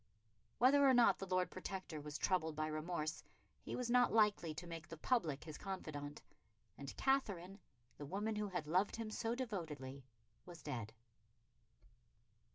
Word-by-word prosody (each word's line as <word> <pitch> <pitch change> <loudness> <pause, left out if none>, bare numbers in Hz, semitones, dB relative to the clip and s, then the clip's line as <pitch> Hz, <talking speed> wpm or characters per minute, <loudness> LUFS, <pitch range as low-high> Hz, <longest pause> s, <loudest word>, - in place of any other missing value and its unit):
Whether 280 +4 +6
or 265 -2 +7
not 230 -6 +6
the 195 - -4
Lord 185 0 +1
Protector 185 -4 -5
was 150 0 -5
troubled 160 -4 +1
by 155 0 0
remorse, 155 0 -2 0.4
he - - -5
was 250 - -1
not 245 0 +5
likely 210 -6 +4
to 155 +3 -6
make 165 -1 -7
the 165 - -8
public 155 - +1
his 155 -1 -8
confidant; 150 -7 -5 0.5
and 140 +1 -8
Katherine, 200 -8 +1 0.4
the 145 - -5
woman 210 +6 -1
who 210 0 0
had 180 -5 -3
loved 185 +6 +2
him 225 -1 -4
so 230 +2 -1
devotedly, 155 - -4 0.4
was 175 -3 -11
dead. 115 -7 -4
180 Hz, 155 wpm, -39 LUFS, 155-215 Hz, 0.5 s, or